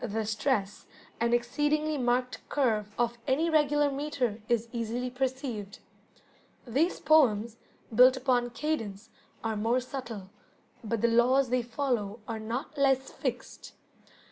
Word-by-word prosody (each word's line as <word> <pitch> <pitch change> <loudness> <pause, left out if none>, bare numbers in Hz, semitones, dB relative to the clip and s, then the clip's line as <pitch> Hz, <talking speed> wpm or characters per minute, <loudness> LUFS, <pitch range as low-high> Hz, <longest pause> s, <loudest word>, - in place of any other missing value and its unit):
The 220 +1 -2
stress, 210 -1 -1 0.3
and 235 +1 +1
exceedingly 295 +6 +1
marked 250 0 0
curve, 215 -6 0
of 240 0 0
any 320 +6 +2
regular 295 -1 +3
metre 270 -6 -2
is 235 -1 +1
easily 240 +1 -3
perceived. 250 -5 -3 0.9
These 280 +9 +1
poems, 235 -7 +3 0.4
built 255 +3 +7
upon 250 -2 +1
cadence, 225 -7 -4 0.3
are 225 -1 -1
more 225 +4 +1
subtle, 240 -7 -7 0.5
but 225 -1 -2
the 235 - +4
laws 250 +3 +4
they 250 0 +2
follow 235 -3 -2
are 225 -1 -4
not 235 +8 -4
less 270 -1 +2
fixed. - - -5
245 Hz, 125 wpm, -29 LUFS, 225-270 Hz, 0.9 s, built